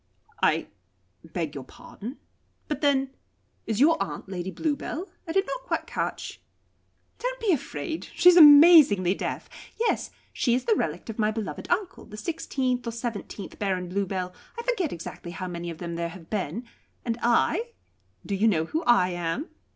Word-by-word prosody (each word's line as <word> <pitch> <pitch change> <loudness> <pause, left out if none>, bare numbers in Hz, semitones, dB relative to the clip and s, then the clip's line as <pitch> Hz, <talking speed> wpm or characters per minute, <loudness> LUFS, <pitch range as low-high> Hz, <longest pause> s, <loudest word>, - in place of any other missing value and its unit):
"I - - +3 0.6
beg 165 -2 -4
your 140 - -6
pardon 225 - -10 0.5
but 300 - -3
then 275 -2 +2 0.6
is 220 -1 -1
your 325 +4 +5
aunt - - -4
Lady 185 -1 -4
Bluebell? 305 - -3 0.2
I - - -3
did 390 +3 +2
not - - -4
quite - - -1
catch - - -4 0.4
" - - -43
"Don't - - -3
be 445 -4 +2
afraid. 320 +2 -3
She - - +4
is 360 - +10
amazingly 290 - +8
deaf. - - -4 0.3
Yes. 465 - 0 0.2
She 240 -2 +2
is 255 - -1
the 455 - +4
relict 235 - -2
of 225 - -12
my 215 -1 +3
beloved 220 -1 -5
uncle, 370 +1 -1
the 210 - -10
sixteenth 255 -2 -2
or - - -1
seventeenth 225 -4 -6
Baron 185 -3 -1
Bluebell 185 -1 -2 0.2
I 470 - -4
forget 455 - 0
exactly 170 +1 -7
how 185 - -5
many 175 -1 -5
of 165 - -7
them 170 0 -5
there 170 0 -2
have 165 -1 -13
been. 205 +1 -2 0.4
And 235 -1 -2
I 365 - +2 0.5
do 200 - -3
you 200 +3 +3
know 165 -7 +2
who 315 - -2
I 240 -7 +5
am?" 175 - -3
230 Hz, 175 wpm, -26 LUFS, -, 0.6 s, is